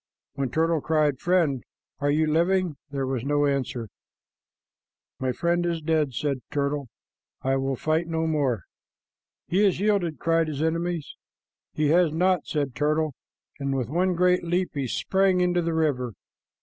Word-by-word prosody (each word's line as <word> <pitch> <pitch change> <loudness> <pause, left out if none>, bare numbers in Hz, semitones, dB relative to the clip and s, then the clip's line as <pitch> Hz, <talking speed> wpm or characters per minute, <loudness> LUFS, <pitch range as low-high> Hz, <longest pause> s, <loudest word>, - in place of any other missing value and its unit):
When 135 -2 -2
Turtle 160 +3 +1
cried, 150 -4 +1
"Friend, 165 -8 +1 0.4
are 145 0 +1
you 155 +2 +3
living?" 170 +2 +2
there 135 -1 -2
was 130 -3 -2
no 145 +1 +2
answer. 135 -4 -1 1.3
"My 130 -1 0
friend 170 +6 0
is 170 -1 -1
dead," 155 -4 0
said 140 0 -1
Turtle. 140 -1 -1 0.6
"I 135 0 +2
will 135 0 -1
fight 155 +5 0
no 160 -1 -1
more." 140 - 0 0.8
"He 185 +4 +2
has 195 -4 +3
yielded," 195 -6 +1
cried 165 -1 +2
his 150 -1 -2
enemies. 165 -1 -2 0.6
"He 150 -1 +1
has 170 0 +4
not," 180 +1 +1
said 145 -4 -1
Turtle, 150 +3 0 0.5
and 140 -1 -1
with 125 -3 -2
one 180 +4 +1
great 180 +1 +3
leap 175 +2 0
he 140 -3 -2
sprang 190 - +2
into 180 -1 +2
the 165 -1 -1
river. 130 -7 0
155 Hz, 155 wpm, -26 LUFS, 140-175 Hz, 1.3 s, has